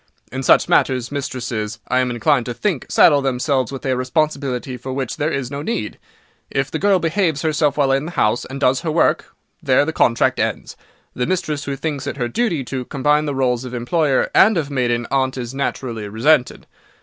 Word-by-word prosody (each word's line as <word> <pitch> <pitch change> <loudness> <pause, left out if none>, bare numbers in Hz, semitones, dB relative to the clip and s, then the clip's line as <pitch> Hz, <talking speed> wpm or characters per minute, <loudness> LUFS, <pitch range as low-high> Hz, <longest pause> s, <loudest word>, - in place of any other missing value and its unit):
In 130 - -4
such 130 - +4
matters, 125 -2 +1
mistresses, 120 -6 -4
I 130 - +2
am 130 -1 +1
inclined 125 +2 +1
to 120 - -4
think, 190 -10 -2
saddle 145 -3 +5
themselves 130 -1 0
with 135 0 -7
a 130 -1 +1
responsibility 130 -1 -1
for 125 +2 -7
which 130 -2 -3
there 150 - 0
is 135 -4 -3
no 140 0 -4
need. 150 - -4 0.5
If 135 0 -2
the 160 - -2
girl 200 -1 +3
behaves 165 -3 0
herself 150 -2 +1
while 140 -2 +2
in 135 +2 +1
the 170 - -6
house, 110 -2 +1
and 135 +1 -7
does 130 -1 +2
her 165 - -3
work, 160 0 +1 0.3
there 140 -2 +3
the 160 - -3
contract 115 -5 +2
ends. - - -2 0.4
The 125 - -2
mistress 155 -6 -2
who 140 - -3
thinks 145 -1 -4
it 140 - -4
her 120 -3 -1
duty 170 - -1
to 130 0 -5
combine 150 +3 +1
the 145 -2 -2
rôles 125 -2 0
of 125 -1 -6
employer 135 +3 +1
and 215 -1 +5
of 145 -3 -2
maiden 120 -3 0
aunt 130 -1 0
is 120 0 -5
naturally 120 -5 -3
resented. 125 +6 +1
135 Hz, 200 wpm, -20 LUFS, 125-150 Hz, 0.5 s, saddle